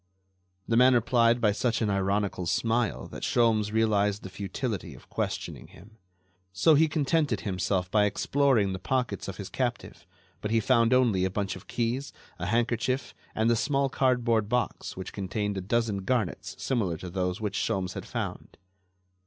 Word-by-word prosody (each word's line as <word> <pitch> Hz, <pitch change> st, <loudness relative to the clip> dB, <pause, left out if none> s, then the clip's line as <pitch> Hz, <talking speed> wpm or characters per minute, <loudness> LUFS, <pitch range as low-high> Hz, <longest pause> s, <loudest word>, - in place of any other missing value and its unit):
The 115 Hz, -, +2 dB
man 125 Hz, +1 st, +6 dB
replied 120 Hz, 0 st, +3 dB
by 110 Hz, -3 st, +3 dB
such 120 Hz, +3 st, 0 dB
an 110 Hz, -3 st, 0 dB
ironical 100 Hz, -2 st, 0 dB
smile 115 Hz, +4 st, 0 dB
that -, -, -8 dB
Sholmes 110 Hz, -3 st, +2 dB
realized 105 Hz, -2 st, +1 dB
the 95 Hz, -, -8 dB
futility 100 Hz, -, -4 dB
of -, -, -17 dB
questioning -, -, -4 dB
him. 110 Hz, +3 st, -17 dB, 0.5 s
So 100 Hz, +12 st, +4 dB
he 160 Hz, +2 st, +5 dB
contented 155 Hz, 0 st, +1 dB
himself 95 Hz, -2 st, -1 dB
by 105 Hz, -1 st, +4 dB
exploring 115 Hz, -2 st, +2 dB
the 95 Hz, -, -4 dB
pockets 125 Hz, +5 st, -2 dB
of -, -, -6 dB
his -, -, -6 dB
captive, -, -, -4 dB, 0.3 s
but 105 Hz, -, -3 dB
he 115 Hz, 0 st, +3 dB
found 115 Hz, +1 st, +3 dB
only 120 Hz, -8 st, +3 dB
a 95 Hz, -, +1 dB
bunch 95 Hz, 0 st, -2 dB
of 95 Hz, -, -12 dB
keys, 125 Hz, +3 st, -2 dB, 0.3 s
a 90 Hz, -, -3 dB
handkerchief 120 Hz, +3 st, 0 dB, 0.2 s
and 110 Hz, +1 st, +1 dB
the 120 Hz, -, +4 dB
small 140 Hz, +3 st, +1 dB
cardboard 120 Hz, -5 st, +1 dB
box 125 Hz, -5 st, -2 dB
which 95 Hz, -, -6 dB
contained 100 Hz, +1 st, -2 dB
a 95 Hz, -, -3 dB
dozen 110 Hz, +1 st, 0 dB
garnets 110 Hz, -2 st, -2 dB
similar 105 Hz, -11 st, -1 dB
to 90 Hz, +1 st, -8 dB
those 90 Hz, +2 st, -1 dB
which 105 Hz, -2 st, -2 dB
Sholmes 95 Hz, -2 st, -1 dB
had -, -, -7 dB
found. -, -, -5 dB
110 Hz, 170 wpm, -28 LUFS, 100-120 Hz, 0.5 s, man